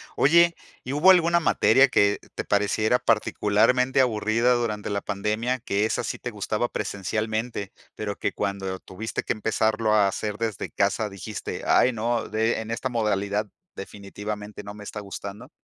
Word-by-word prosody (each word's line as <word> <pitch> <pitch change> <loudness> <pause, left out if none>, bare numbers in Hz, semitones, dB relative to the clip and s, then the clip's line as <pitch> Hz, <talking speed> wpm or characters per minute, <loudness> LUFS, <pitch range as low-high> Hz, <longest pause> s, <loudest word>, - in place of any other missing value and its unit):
Oye, 170 +4 +5 0.3
¿y 130 - -4
hubo 175 +6 +6
alguna 170 -1 +4
materia 130 -1 +5
que 100 -2 +3 0.2
te - - -4
pareciera 110 +3 +2
particularmente 115 +4 +2
aburrida 115 0 +2
durante 110 -4 -2
la 100 -1 -1
pandemia, 110 +5 -1
que 105 -2 0
esa - - -1
sí - - -3
te 120 - -6
gustaba 110 +3 -2
presencialmente, 105 +1 -3 0.2
pero 105 -1 -4
que - - -1
cuando 95 -2 -3
tuviste 110 +4 -5
que - - 0
empezarlo 110 0 0
a 105 -2 +5
hacer 105 +2 -3
desde 115 -2 -3
casa 100 +2 0
dijiste: 100 +2 -6
"Ay, 125 - +4
no, 115 0 -1
de 110 +1 0
en 110 +1 -7
esta 125 +3 -2
modalidad 105 -2 0 0.3
definitivamente 105 +1 -7
no 105 0 -8
me 105 0 -10
está 105 - -6
gustando"? 100 +5 -8
110 Hz, 155 wpm, -25 LUFS, 100-120 Hz, 0.3 s, hubo